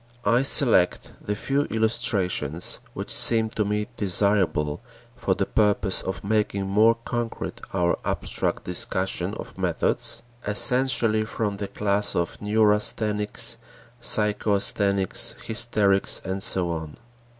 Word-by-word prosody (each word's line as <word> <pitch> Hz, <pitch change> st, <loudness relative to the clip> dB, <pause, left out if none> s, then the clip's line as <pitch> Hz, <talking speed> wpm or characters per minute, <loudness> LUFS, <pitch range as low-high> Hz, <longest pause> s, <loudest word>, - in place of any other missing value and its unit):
I 115 Hz, +4 st, +3 dB
select 125 Hz, -, +3 dB
the 105 Hz, -, -3 dB
few 140 Hz, +6 st, -2 dB
illustrations 95 Hz, -, 0 dB, 0.2 s
which -, -, -3 dB
seem 110 Hz, -1 st, +6 dB
to 110 Hz, -, -2 dB
me 105 Hz, +1 st, -2 dB
desirable 95 Hz, -6 st, 0 dB, 0.3 s
for -, -, -1 dB
the -, -, -2 dB
purpose 105 Hz, -2 st, 0 dB
of 95 Hz, -2 st, -6 dB
making 100 Hz, -1 st, -1 dB
more 110 Hz, +4 st, +3 dB
concrete 120 Hz, -1 st, -5 dB
our 90 Hz, -2 st, -1 dB
abstract -, -, -2 dB
discussion 95 Hz, +2 st, -1 dB
of -, -, -10 dB
methods, 90 Hz, -3 st, -1 dB, 0.2 s
essentially 115 Hz, 0 st, +4 dB
from 105 Hz, -2 st, -4 dB
the 100 Hz, 0 st, -5 dB
class 100 Hz, +1 st, 0 dB
of 85 Hz, -1 st, -3 dB
neurasthenics, 105 Hz, 0 st, 0 dB, 0.4 s
psychasthenics, 100 Hz, -3 st, +1 dB
hysterics, 110 Hz, -4 st, +1 dB
and 95 Hz, +1 st, -4 dB
so 95 Hz, -5 st, +3 dB
on. 80 Hz, -2 st, -7 dB
105 Hz, 115 wpm, -23 LUFS, 95-110 Hz, 0.4 s, seem